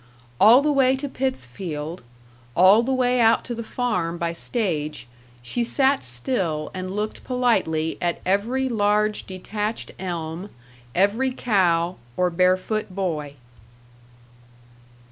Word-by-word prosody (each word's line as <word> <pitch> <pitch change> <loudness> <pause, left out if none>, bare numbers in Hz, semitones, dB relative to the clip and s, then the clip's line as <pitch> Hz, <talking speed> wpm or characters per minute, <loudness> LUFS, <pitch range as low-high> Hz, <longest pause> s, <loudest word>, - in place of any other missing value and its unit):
All 235 +7 +7
the 300 - +2
way 265 -2 +4
to 275 +2 -4
Pittsfield, 170 - -4 0.5
all 190 +5 +7
the 250 +3 -2
way 250 -1 +2
out 225 0 +4
to 245 - -4
the 230 - -5
farm 180 -9 -2
by 170 0 -2
stage, 165 - -2 0.4
she 235 - -2
sat 270 +3 +2
still 155 - -2
and 185 0 -5
looked 210 +1 -3
politely 195 -11 0
at 175 -1 0
every 230 +8 +1
large 210 -2 +1
detached 210 +4 -4
elm, 175 +1 -5 0.5
every 210 +8 +2
cow 185 -8 +1 0.2
or 180 -1 +2
barefoot 185 +5 +1
boy. 165 -7 -3
195 Hz, 120 wpm, -23 LUFS, 170-240 Hz, 0.5 s, All